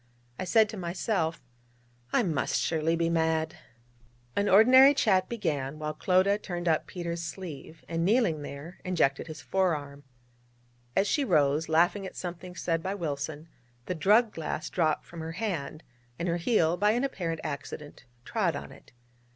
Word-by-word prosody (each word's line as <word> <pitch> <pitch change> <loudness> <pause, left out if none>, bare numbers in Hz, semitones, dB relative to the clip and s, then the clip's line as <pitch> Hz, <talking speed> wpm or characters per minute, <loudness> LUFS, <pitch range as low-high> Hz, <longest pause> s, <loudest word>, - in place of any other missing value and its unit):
I - - -2
said 220 +3 +4
to 220 - -7
myself: 170 - -2 0.7
'I - - +3
must 160 -8 0
surely 160 0 +1
be 165 0 +1
mad!' 160 0 0 0.8
An 200 0 +1
ordinary 260 +7 +8
chat 190 -8 +2
began, 155 - -2
while 155 0 -3
Clodagh 190 +5 +2
turned 175 -2 -4
up 160 -2 +2
Peters' 170 -2 -4
sleeve, 165 -3 -8
and, 165 0 -1
kneeling 195 -6 +2
there, 145 +4 -8
injected 165 -6 +1
his 155 -1 -8
fore 190 -3 +1
arm. 145 -1 -9 0.9
As 195 - +3
she 290 - +1
rose, 155 - +2
laughing 175 +5 +2
at - - -11
something 180 0 -7
said 165 -2 -1
by 190 +3 -3
Wilson, 150 -2 -4 0.4
the - - -2
drug 210 +7 +3
glass 155 -1 -4
dropped 160 -3 +1
from 170 - -10
her 160 0 -5
hand, 165 -7 -4 0.3
and 170 - -3
her 170 0 +1
heel, 175 -3 +2
by 210 +3 +3
an 245 +3 0
apparent 170 -12 -3
accident, 145 +1 -7 0.2
trod - - 0
on - - -7
it. - - -17
170 Hz, 160 wpm, -28 LUFS, 155-195 Hz, 0.9 s, ordinary